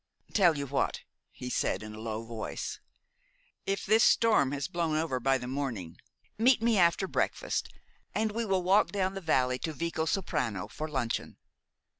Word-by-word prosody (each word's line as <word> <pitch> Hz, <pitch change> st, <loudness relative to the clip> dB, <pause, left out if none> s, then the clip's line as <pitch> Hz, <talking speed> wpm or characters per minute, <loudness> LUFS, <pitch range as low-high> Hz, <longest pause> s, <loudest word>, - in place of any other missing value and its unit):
"Tell 175 Hz, -7 st, +4 dB
you 140 Hz, -, -2 dB
what," 140 Hz, 0 st, -1 dB, 0.3 s
he 125 Hz, -, -8 dB
said 105 Hz, -, 0 dB
in 110 Hz, 0 st, -8 dB
a 110 Hz, -, -9 dB
low 110 Hz, 0 st, -4 dB
voice, 115 Hz, -1 st, -5 dB, 0.9 s
"if 195 Hz, 0 st, -1 dB
this 220 Hz, +1 st, +5 dB
storm 215 Hz, -, +4 dB
has 140 Hz, -1 st, -2 dB
blown 165 Hz, -3 st, -1 dB
over 155 Hz, -5 st, -1 dB
by 135 Hz, +2 st, +2 dB
the 125 Hz, -, -7 dB
morning, 125 Hz, -11 st, -4 dB, 0.4 s
meet 245 Hz, +2 st, +5 dB
me 230 Hz, 0 st, +2 dB
after 175 Hz, +2 st, +3 dB
breakfast, -, -, -1 dB, 0.5 s
and 215 Hz, 0 st, +1 dB
we 230 Hz, +2 st, -2 dB
will 190 Hz, -4 st, 0 dB
walk 195 Hz, +4 st, +4 dB
down 190 Hz, -2 st, 0 dB
the 195 Hz, -, -5 dB
valley 130 Hz, -6 st, +1 dB
to 160 Hz, -, -3 dB
Vicosoprano 160 Hz, -, -1 dB
for 155 Hz, -, -5 dB
luncheon. 130 Hz, -6 st, -2 dB
155 Hz, 165 wpm, -30 LUFS, 125-195 Hz, 0.9 s, this